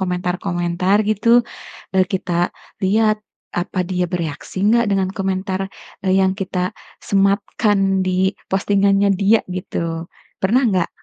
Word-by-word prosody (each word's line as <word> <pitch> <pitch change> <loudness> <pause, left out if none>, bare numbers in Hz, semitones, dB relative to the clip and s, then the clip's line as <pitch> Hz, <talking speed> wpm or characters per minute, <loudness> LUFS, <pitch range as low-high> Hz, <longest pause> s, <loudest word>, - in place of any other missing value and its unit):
komentar-komentar 180 0 0
gitu, 215 +2 0 0.7
eee, 185 -1 +5
kita 175 -2 0 0.3
lihat, 215 +2 +3 0.4
apa 185 +1 -1
dia 180 0 -1
bereaksi 165 +1 -4
nggak 235 0 +4
dengan 190 -1 +1
komentar, 190 0 -2 0.4
eee, 190 0 +3
yang 190 0 +3
kita 185 -1 -2 0.3
sematkan 195 -1 +2
di 185 +1 +2 0.2
postingannya 200 +1 +3
dia 205 +3 +4
gitu, 170 -3 -4 0.4
pernah 235 +8 +3
nggak? 185 -3 +1
190 Hz, 115 wpm, -20 LUFS, 180-200 Hz, 0.7 s, eee